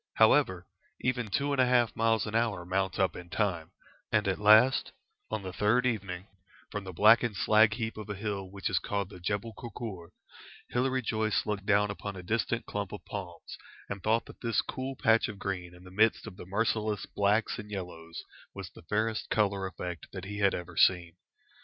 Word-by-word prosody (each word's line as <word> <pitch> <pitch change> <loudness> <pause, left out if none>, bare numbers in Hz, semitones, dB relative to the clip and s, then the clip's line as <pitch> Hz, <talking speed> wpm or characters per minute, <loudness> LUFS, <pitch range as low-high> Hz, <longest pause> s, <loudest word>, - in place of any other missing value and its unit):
However, 90 -1 +4 0.4
even 125 -2 0
two 140 +7 0
and 140 -2 +3
a 130 - +4
half 120 -2 +3
miles 115 -1 +2
an 105 - -5
hour 110 -6 0
mount 95 +1 -1
up 95 -1 +1
in 90 -1 -9
time, 90 -5 -1 0.4
and 105 -3 +2
at 95 - 0
last, 110 +6 +5 0.4
on 100 - -3
the 95 -1 -6
third 105 +6 +2
evening, 95 -6 -2 0.5
from 105 -1 -4
the 95 - -6
blackened 110 +4 +5
slag 110 +2 +4
heap 115 -2 -3
of 105 -1 -7
a 105 - -3
hill 100 -2 -4
which 100 +1 -4
is 95 -4 +1
called 100 -2 -2
the 90 - -10
Jebel 100 +5 -2
Kurkur, 110 -7 -7 0.6
Hilary 130 +1 +1
Joyce 110 -1 0
looked 105 -2 -3
down 105 0 +3
upon 100 0 -6
a 90 - -8
distant 115 +4 -1
clump 100 -2 -4
of 105 - -8
palms, 90 -4 -7 0.3
and 100 -1 -5
thought 110 +4 +1
that - - -14
this 115 -2 +1
cool 130 +1 -5
patch 115 0 +3
of 105 -3 -7
green 90 -3 -4
in 90 - -15
the 90 - -13
midst 110 +3 +3
of 110 -4 -9
the 90 - -10
merciless 105 0 0
blacks 105 +2 +1
and 105 0 -8
yellows 90 -4 -7 0.3
was 95 -3 -7
the - - -14
fairest 110 +5 -1
colour 100 -3 +1
effect 90 -3 -6
that 95 -1 -6
he 105 +1 -5
had 100 -1 +3
ever 90 0 -7
seen. 85 -2 +3
105 Hz, 195 wpm, -30 LUFS, 95-110 Hz, 0.6 s, last